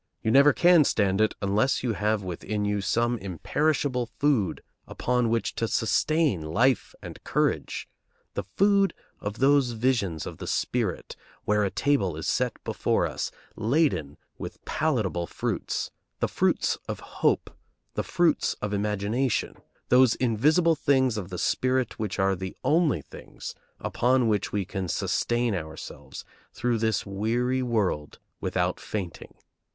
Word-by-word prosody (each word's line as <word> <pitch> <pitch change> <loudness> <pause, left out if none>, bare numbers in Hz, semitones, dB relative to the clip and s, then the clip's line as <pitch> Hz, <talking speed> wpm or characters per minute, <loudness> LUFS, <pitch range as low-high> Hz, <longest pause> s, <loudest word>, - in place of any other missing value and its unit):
You 110 - +1
never 140 +4 +7
can 175 +2 +6
stand 100 -6 +2
it 110 - +2
unless 105 +8 +1
you 120 -3 0
have 105 0 0
within 105 +4 -3
you 105 0 0
some 120 +5 +1
imperishable 125 - 0
food 130 -8 0 0.2
upon 125 -1 0
which 115 0 0
to 115 - 0
sustain 145 - +1
life 115 +12 +1
and - - -9
courage, - - -1 0.5
the 100 - -3
food 200 0 +4 0.2
of 105 +1 -5
those 135 -2 +3
visions 110 - 0
of - - -8
the - - -6
spirit 115 -8 -1 0.3
where 105 0 +2
a 100 - +1
table 100 - +1
is 80 - -4
set - - +1
before - - 0
us - - -3 0.3
laden 110 - +1 0.2
with - - -8
palatable 110 - 0
fruits, - - -3 0.3
the - - +1
fruits - - +1
of - - -3 0.2
hope, - - +2 0.4
the - - -1
fruits - - +1
of 105 0 -4
imagination, 105 +5 0 0.4
those 125 -1 +6
invisible 150 +9 +3
things 135 -5 +2
of 100 -4 -4
the 90 - -5
spirit 130 +5 0
which 105 -4 -3
are 95 0 +2
the 95 0 -6
only 150 - +2
things 70 - -9 0.3
upon 125 0 +2
which 105 -2 0
we 100 -2 -1
can 95 -1 -4
sustain 120 +6 0
ourselves 80 -3 -7 0.3
through 120 -1 0
this 110 -3 0
weary 120 +6 0
world 105 -11 -1 0.2
without 90 -1 -1
fainting. 95 -6 -6
110 Hz, 140 wpm, -27 LUFS, 100-130 Hz, 0.5 s, never